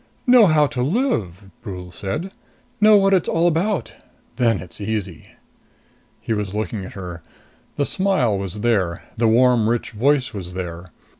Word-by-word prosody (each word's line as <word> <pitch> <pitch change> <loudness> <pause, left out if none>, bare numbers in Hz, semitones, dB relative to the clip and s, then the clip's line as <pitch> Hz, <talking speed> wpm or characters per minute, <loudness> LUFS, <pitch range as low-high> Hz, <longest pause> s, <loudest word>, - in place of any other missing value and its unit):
"Know 245 -4 +7
how 155 -2 +4
to 130 -3 -3
live," 110 - -1
Brule 90 -5 -8
said. 105 - -4 0.5
"Know 215 0 +7
what 195 0 +3
it's 185 - +2
all 165 +1 +2
about. 175 +4 0 0.5
Then 115 -4 +2
it's 90 +2 -10
easy." 105 -1 -5 0.8
He 115 - -3
was 105 -2 -3
looking 105 -1 -3
at 95 - -9
her. 90 -3 -8 0.5
The 145 - 0
smile 185 - +1
was 100 +1 -4
there. 100 -7 0
The 115 0 +2
warm, 120 -1 +4
rich 120 0 -1
voice 130 +4 +1
was 90 -3 -7
there. 90 -1 -6
115 Hz, 155 wpm, -21 LUFS, 95-155 Hz, 0.8 s, Know